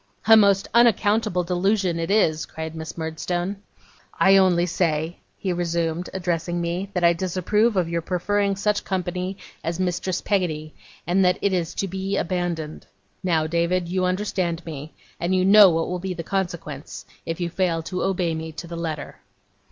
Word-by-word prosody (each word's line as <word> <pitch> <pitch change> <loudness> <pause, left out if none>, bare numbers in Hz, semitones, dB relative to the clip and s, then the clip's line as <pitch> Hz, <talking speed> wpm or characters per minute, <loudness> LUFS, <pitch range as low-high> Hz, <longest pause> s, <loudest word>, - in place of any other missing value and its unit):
'A 225 +2 +8
most 200 -2 +4
unaccountable 215 -5 +3
delusion 180 0 +1
it 165 - -2
is!' 165 -7 +2
cried 160 0 -6
Miss 160 0 -7
Murdstone. 175 +4 -3 0.6
'I 195 0 +6
only 180 -2 +4
say,' 165 -1 -1 0.2
he 185 -2 -2
resumed, 170 0 -1
addressing 175 -2 -2
me, 175 +3 -2
'that 180 -3 -2
I 170 0 +6
disapprove 190 +5 +1
of 180 -3 +2
your 170 0 -1
preferring 200 +4 0
such 205 +1 0
company 185 0 -3 0.3
as 165 +2 -3
Mistress 185 0 -1
Peggotty, 155 -6 -1 0.3
and 185 +2 +2
that 180 0 +3
it 200 - +1
is 170 -2 -1
to 195 - -1
be 190 +1 -2
abandoned. 170 -3 -3 0.4
Now, 165 -4 +2
David, 170 +2 0
you 185 +1 0
understand 180 -2 -1
me, 155 -1 -8 0.2
and 175 +2 0
you 185 0 +2
know 200 0 +9
what 165 -1 0
will 180 0 -3
be 185 0 -4
the 165 - -5
consequence 165 -6 -4 0.2
if 165 +1 -3
you 170 -1 -2
fail 170 -3 0
to 180 +2 -4
obey 180 -3 0
me 160 0 -5
to 165 - -7
the 170 0 -7
letter. 160 -3 -5
175 Hz, 170 wpm, -23 LUFS, 165-190 Hz, 0.6 s, know